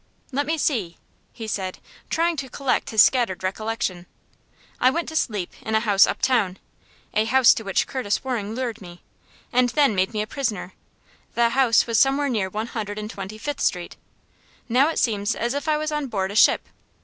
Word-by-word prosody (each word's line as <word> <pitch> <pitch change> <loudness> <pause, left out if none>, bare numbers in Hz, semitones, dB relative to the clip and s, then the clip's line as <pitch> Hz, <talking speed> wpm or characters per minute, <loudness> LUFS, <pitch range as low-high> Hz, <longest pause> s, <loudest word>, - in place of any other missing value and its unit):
"Let 285 +2 -1
me 320 +1 0
see," 220 - -1 0.3
he 225 - -8
said, 190 -4 -3 0.3
trying 335 +1 +1
to 270 -2 -4
collect 275 0 -1
his 220 -2 +6
scattered 235 -9 +1
recollection. 190 -2 -3 0.7
"I 255 - +5
went 330 +5 -2
to 320 - -8
sleep 210 - -1
in 220 - -2
a - - +5
house 205 -3 +4
uptown 205 -8 +1 0.6
a 215 +1 +2
house 255 +1 +6
to 225 - -5
which 195 -2 0
Curtis 235 -6 -2
Waring 225 -5 -3
lured 235 -3 -4
me, 175 -2 -12 0.5
and 250 0 +4
then 280 -2 +3
made 190 +1 +1
me 210 -2 -1
a - - -5
prisoner. 215 -7 -3 0.6
The 235 0 +3
house 245 -2 +3
was 230 -2 +1
somewhere 275 +1 +3
near 210 -6 -1
One 215 +3 -3
Hundred 210 -2 -4
and 215 +1 -5
Twenty 195 +2 -7
fifth 290 +6 -4
Street. - - -1 0.7
Now 255 +5 +3
it 325 - -3
seems 210 -1 0
as 240 +2 -1
if 285 +2 -4
I 305 -1 +2
was 310 0 -2
on 300 -2 -2
board 195 -5 -2
a - - -7
ship. - - +4
230 Hz, 195 wpm, -23 LUFS, 205-265 Hz, 0.7 s, his